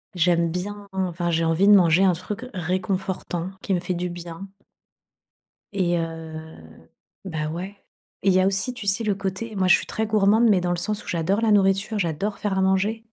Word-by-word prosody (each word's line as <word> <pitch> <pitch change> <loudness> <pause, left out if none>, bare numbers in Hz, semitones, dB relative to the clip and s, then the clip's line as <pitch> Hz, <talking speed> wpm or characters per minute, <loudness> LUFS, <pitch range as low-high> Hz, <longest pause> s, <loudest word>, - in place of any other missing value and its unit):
j'aime 170 -1 +2
bien 200 +4 -5
enfin, 175 -2 -2
j'ai 165 0 +1
envie 165 +5 +2
de 210 - +8
manger 175 0 +5
un 185 - +4
truc 205 +8 -6
réconfortant, 185 0 -3
qui 195 - -1
me 175 - +1
fait 180 +1 -3
du 175 +1 -3
bien. 175 +2 -8 1.3
Et 175 -3 +1
heu, 165 -1 -5 0.9
bah, 155 -4 -3
ouais. 185 +5 -6 0.5
Il 195 - +4
y 185 - +4
a 185 - +3
aussi, 195 +6 -1
tu 225 -5 -6
sais? 200 +4 +3
Le 205 -2 0
côté, 200 +3 -4
moi 185 -1 +1
je 185 - +7
suis - - -3
très 220 - -2
gourmande, 215 +2 +3
mais 190 -4 +4
dans 175 - -1
le 175 - 0
sens 210 +4 -2
où - - -17
j'adore 180 +6 0
la 220 -2 +2
nourriture, 200 +1 +2
j'adore 195 +4 -2
faire 200 -2 -1
à - - +2
manger, 200 +4 +1
190 Hz, 200 wpm, -24 LUFS, 175-205 Hz, 1.3 s, de